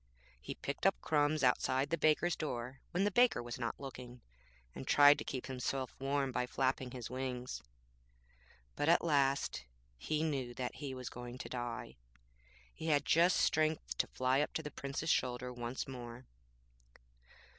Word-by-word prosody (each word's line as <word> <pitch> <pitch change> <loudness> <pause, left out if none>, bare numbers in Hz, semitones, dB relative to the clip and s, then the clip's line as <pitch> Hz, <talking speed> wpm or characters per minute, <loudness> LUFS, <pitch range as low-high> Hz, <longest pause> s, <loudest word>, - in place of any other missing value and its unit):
He 65 - -6
picked - - -1
up - - +2
crumbs 145 - +2
outside 130 +2 +2
the - - +4
baker's 155 +3 +3
door 130 -3 -4
when 180 +3 0
the 205 - +2
baker 240 - +4
was 120 +1 -6
not 115 -1 -3
looking, 125 -3 -8 0.5
and 130 - -8
tried 145 0 +7
to - - -3
keep 130 -2 -4
himself 130 0 -3
warm 135 0 0
by 125 0 -1
flapping 130 0 0
his 125 -1 -7
wings. 125 -1 -4 1.1
But 145 - +1
at 170 - +5
last 140 -4 +2 0.4
he 155 - -1
knew 135 -6 -2
that 125 -1 -3
he 140 -3 -5
was 125 -1 -5
going 120 0 -7
to - - -7
die. 120 -2 -5 0.8
He 160 - -6
had 145 -2 +3
just 170 +3 +5
strength 155 - +1
to - - +2
fly 130 +2 +1
up 150 - -2
to 160 - -1
the 150 - -6
Prince's 140 +4 -2
shoulder 125 0 0
once 120 +1 -4
more.' 125 -1 -8
130 Hz, 165 wpm, -35 LUFS, 125-150 Hz, 1.1 s, tried